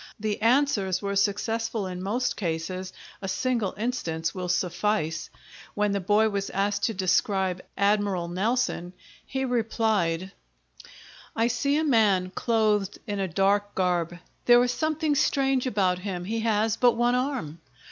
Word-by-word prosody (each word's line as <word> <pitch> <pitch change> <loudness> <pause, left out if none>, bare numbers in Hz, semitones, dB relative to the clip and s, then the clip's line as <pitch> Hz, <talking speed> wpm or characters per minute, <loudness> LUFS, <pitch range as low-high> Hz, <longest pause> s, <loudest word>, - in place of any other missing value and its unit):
The 215 0 -2
answers 225 -7 +2
were 200 0 -3
successful 220 +2 0
in 180 -1 -5
most 245 +6 -1
cases; 185 +1 -3 0.3
a 195 - -4
single 225 0 -1
instance 170 -9 -2
will 180 -2 -4
suffice. 175 -2 -1 0.5
When 210 0 +1
the 200 - 0
boy 210 +4 +3
was 200 -1 -2
asked 200 +1 0
to 225 - -1
describe 185 0 +1 0.2
Admiral 200 -3 +1
Nelson, 190 -1 -1 0.3
he 265 0 -3
replied: 220 -7 0 1.0
"I 225 - +2
see 280 +5 +1
a 315 - +1
man 210 -10 +3
clothed 210 -2 +1
in 205 -3 -3
a 195 - 0
dark 200 +3 +1
garb; 175 -2 0 0.3
there 240 0 +7
is 245 - +1
something 310 +2 0
strange 270 -2 +1
about 190 -6 +1
him, 180 -2 -4
he 225 +4 -2
has 220 0 +1
but 245 -1 +4
one 240 +1 +2
arm." 250 - -2
205 Hz, 145 wpm, -26 LUFS, 185-230 Hz, 1.0 s, there